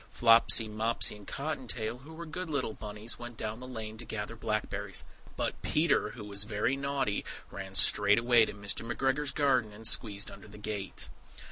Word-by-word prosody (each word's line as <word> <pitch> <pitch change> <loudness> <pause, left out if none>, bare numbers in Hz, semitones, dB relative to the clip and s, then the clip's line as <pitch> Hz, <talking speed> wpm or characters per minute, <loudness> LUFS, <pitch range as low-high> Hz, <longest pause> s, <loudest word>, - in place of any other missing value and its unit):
Flopsy, 115 -1 +6
Mopsy, 110 +1 +1
and 105 -1 -14
Cotton 140 -2 -4
tail, 115 +1 -2
who 155 +5 -12
were 170 +1 -7
good 175 +2 -5
little 135 -7 -1
bunnies, 105 +2 -5
went 120 -1 -8
down 110 +1 -4
the 125 - -8
lane 110 -3 -6
to 120 - -3
gather 110 +1 -4
blackberries; 105 -3 -2 0.3
But - - -2
Peter, 155 +1 +2
who 115 - -8
was 100 0 +2
very 105 +5 0
naughty, 135 -6 -1 0.3
ran 95 -1 -7
straight 105 +1 +5
away 120 -1 +5
to - - -6
Mr. 100 +2 -3
McGregor's 135 +4 0
garden, 130 -7 +2
and 110 +2 -4
squeezed 105 -3 +1
under - - -12
the 105 - -13
gate! 105 -2 -3
115 Hz, 180 wpm, -31 LUFS, 105-130 Hz, 0.3 s, Flopsy